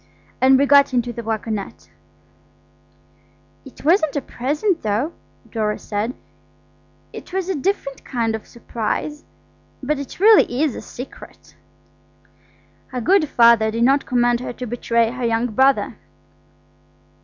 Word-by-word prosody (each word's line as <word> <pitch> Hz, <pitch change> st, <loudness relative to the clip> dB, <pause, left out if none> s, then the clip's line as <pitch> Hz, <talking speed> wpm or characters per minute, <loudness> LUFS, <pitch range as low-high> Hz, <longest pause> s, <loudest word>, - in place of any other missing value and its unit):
And 265 Hz, +1 st, +6 dB
we 280 Hz, -, +3 dB
got 280 Hz, -2 st, +5 dB
into 240 Hz, 0 st, 0 dB
the 235 Hz, -, -6 dB
waggonette. 215 Hz, -, -5 dB, 1.8 s
"It 270 Hz, -, -14 dB
wasn't 315 Hz, -2 st, +3 dB
a 285 Hz, -, 0 dB
present, 300 Hz, -, -1 dB
though," 220 Hz, +10 st, -1 dB, 0.4 s
Dora 215 Hz, -2 st, -1 dB
said; 215 Hz, +4 st, -3 dB, 1.0 s
"it -, -, -10 dB
was 375 Hz, -1 st, -2 dB
a -, -, +1 dB
different 290 Hz, -4 st, -3 dB
kind 230 Hz, -3 st, -2 dB
of 220 Hz, -1 st, -6 dB
surprise–but 275 Hz, +4 st, -5 dB
it 280 Hz, -, -8 dB
really 390 Hz, -, +5 dB
is 300 Hz, -6 st, 0 dB
a -, -, -6 dB
secret." 250 Hz, +2 st, -11 dB, 1.4 s
Our 255 Hz, -, -3 dB
good 350 Hz, -, +3 dB
Father 235 Hz, -2 st, +5 dB
did 230 Hz, +2 st, -1 dB
not 275 Hz, +3 st, +3 dB
command 240 Hz, -1 st, +2 dB
her 250 Hz, -, -6 dB
to 250 Hz, -, -7 dB
betray 235 Hz, -1 st, 0 dB
her 250 Hz, 0 st, -6 dB
young 230 Hz, +1 st, 0 dB
brother. 265 Hz, -4 st, +2 dB
250 Hz, 130 wpm, -20 LUFS, 230-285 Hz, 1.8 s, And